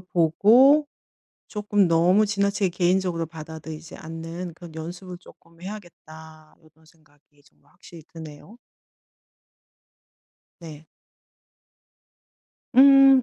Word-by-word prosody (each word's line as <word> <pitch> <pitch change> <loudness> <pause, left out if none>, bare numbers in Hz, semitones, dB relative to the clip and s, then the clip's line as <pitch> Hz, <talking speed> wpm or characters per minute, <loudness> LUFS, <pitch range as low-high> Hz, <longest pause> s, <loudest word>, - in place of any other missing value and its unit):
보고 210 - +3 0.6
쪼끔 205 -2 0
너무 175 +5 +3
지나치게 200 -1 -1
개인적으로 180 -1 -1
받아들이지 160 0 -10
않는 165 +2 -8
그런 170 -1 -13
연습을 175 +3 -8
쪼끔 170 -2 -21
해야겠다.' 160 -5 -12 0.2
이런 160 +1 -28
생각이 145 -2 -29
좀 - - -29
확실히 165 -3 -16
드네요. 160 +6 -12 2.0
네. 160 -2 -12 1.9
음. 270 0 +7
170 Hz, 215 characters per minute, -23 LUFS, 160-200 Hz, 2.0 s, 음